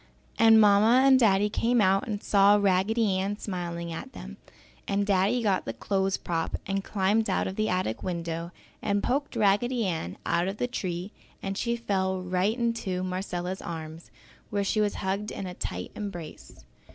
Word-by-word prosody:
And 225 -1 +7
Mamma 215 +5 +5
and 265 -1 +6
Daddy 205 -3 +4
came 235 +3 +1
out 195 +4 +3
and 210 -2 -4
saw 200 0 +5
Raggedy 200 0 +1
smiling 170 -4 -4
at - - -7
them, 65 +1 -9 0.5
and 200 0 0
Daddy 200 +5 +2
got 195 -3 +1
the 115 - -4
clothes 195 - 0
prop 165 -1 -2
and 195 0 -2
climbed 205 +3 +1
out - - +1
of 190 - -4
the 215 +1 0
attic 180 -12 -1
window 170 -1 -4 0.3
and 200 0 0
poked 280 +1 -1
Raggedy 225 +3 +2
Ann 160 - -3
out 175 +2 +1
of 195 +2 -3
the 245 - 0
tree 185 -5 -4 0.3
and 195 0 -3
she 235 +3 -1
fell 190 -5 -1
right 185 +5 0
into 230 -6 -1
Marcella's 185 0 -3
arms 160 0 -7 0.4
where 205 -1 -1
she 215 +2 +1
was 205 -1 0
hugged 200 +3 -1
in 195 - -5
a 180 - -6
tight 90 - -5
embrace. 175 -7 -8
195 Hz, 170 wpm, -27 LUFS, 180-215 Hz, 0.5 s, And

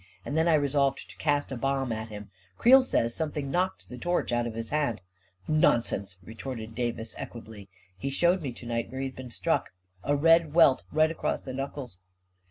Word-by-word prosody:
And 145 - -3
then 160 +1 +3
I 165 - +5
resolved 140 -2 +1
to - - -17
cast 145 -2 0
a - - -2
bomb 135 0 -1
at 110 0 -4
him. 105 -2 -9
" 90 +1 -34
Creel 265 +3 +7
says 115 - +1
something 150 -2 -3
knocked 185 +3 -1
the 125 - -9
torch 175 -2 0
out 120 0 +1
of 115 - -6
his 115 0 -4
hand." 145 -7 0 0.5
11 155 0 +2
Nonsense! 100 -7 +2
" - - -22
retorted 115 -1 -7
Davis, 115 -2 -3
equably. 110 -4 -9 0.3
44 - - -32
He 140 - -2
showed 175 +6 +2
me 140 -5 -3
to 120 - -12
night 115 0 -2
where 130 +1 -5
he - - -1
had 130 - -6
been 130 -1 -8
struck - - 0 0.2
— - - -47
a 145 - +1
red 165 +1 +4
welt 160 -6 +5
right 155 +1 +3
across 165 - -2
the 130 - -6
knuckles." 135 -6 -6
135 Hz, 220 wpm, -28 LUFS, 115-150 Hz, 0.5 s, Creel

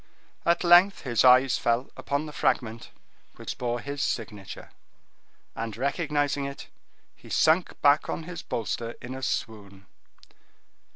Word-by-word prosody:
At 170 +1 +3
length 175 +3 +6
his 120 -5 +1
eyes 130 0 +6
fell 120 +3 0
upon 145 +2 -2
the 150 - -8
fragment 120 -5 -1 0.5
which - - -7
bore 120 -1 -1
his 140 +2 -5
signature, 105 -6 -5 0.8
and 110 -2 -5
recognizing 145 +1 -1
it, 140 0 -8 0.5
he - - -16
sunk 160 +3 +2
back 145 +2 +4
on - - -3
his 170 0 -7
bolster 115 +1 -4
in 125 +1 -8
a 130 - -7
swoon. 100 -6 -4
130 Hz, 130 wpm, -26 LUFS, 115-150 Hz, 0.8 s, length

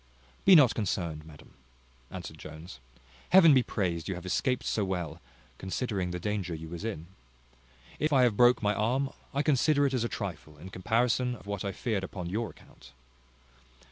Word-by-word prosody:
"Be 190 - +9
not 140 -7 +7
concerned, 85 -7 -3
madam," 75 -2 -15 0.6
answered 85 -4 -8
Jones. 80 -3 -10 0.5
"Heaven 170 -5 +8
be 130 - +5
praised 85 -9 -2
you 95 - -2
have 90 +1 -9
escaped 125 +7 0
so 105 - 0
well, 90 -5 -4 0.4
considering 95 -1 -2
the 90 0 -4
danger 95 -2 -3
you 80 0 -8
was 85 +3 -7
in. 105 -8 -4 0.9
If 155 +1 +1
I 135 -3 +5
have 120 -4 +3
broke 120 +1 +5
my 105 0 +2
arm, 125 +7 0 0.2
I 140 +2 0
consider 145 0 +3
it 135 - 0
as 125 -3 0
a 120 - -1
trifle, 80 -7 -6
in 90 +6 -11
comparison 120 +6 +1
of 110 - -15
what 100 -2 -4
I 100 - -2
feared 100 0 -2
upon 90 -2 -6
your 110 +1 -2
account." 65 -4 -17
100 Hz, 175 wpm, -29 LUFS, 85-125 Hz, 0.9 s, Be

